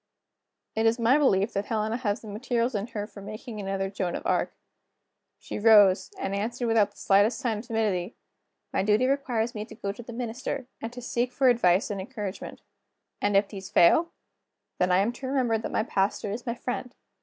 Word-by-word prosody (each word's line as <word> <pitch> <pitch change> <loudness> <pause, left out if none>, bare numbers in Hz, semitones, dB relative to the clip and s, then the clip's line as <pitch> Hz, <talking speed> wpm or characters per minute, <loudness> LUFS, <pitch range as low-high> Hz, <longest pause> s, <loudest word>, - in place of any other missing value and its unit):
It 220 +1 +2
is 225 +1 +3
my 245 +5 +4
belief 205 -7 +2
that 200 +1 -1
Helena 220 0 -1
has 210 -5 -2
the 220 - -11
materials 235 +3 -1
in 205 0 -2
her 205 -3 -4
for 205 -1 -12
making 215 +2 -8
another 195 -1 -2
Joan 185 -3 -2
of - - -6
Arc. - - 0 0.8
She - - -6
rose, 205 -3 +6
and 195 - -3
answered 235 +5 -2
without 225 -3 +3
the - - -26
slightest 205 +4 +3
sign 235 -6 -1
of 230 - -10
timidity: 215 -4 -1 0.6
"My - - +2
duty 210 +5 +3
requires 250 -4 0
me 210 - -4
to 220 - -12
go 200 -2 -3
to 210 - -9
the 235 - -10
minister, 245 +3 -4 0.2
and 225 - -4
to 245 0 -9
seek 240 +1 -1
for 265 0 +3
advice 195 -5 +3
and 200 -2 -3
encouragement." 205 -3 -6 0.6
"And 205 -1 +3
if 200 0 +2
these 195 -2 -8
fail?" 320 - +5 0.7
"Then 180 0 +2
I 180 - +5
am 200 +5 +2
to 260 +2 -7
remember 250 -4 +1
that - - -5
my - - +1
pastor 200 -1 -1
is 235 +5 -6
my 235 - -1
friend. 250 +1 -5
220 Hz, 200 wpm, -27 LUFS, 200-240 Hz, 0.8 s, rose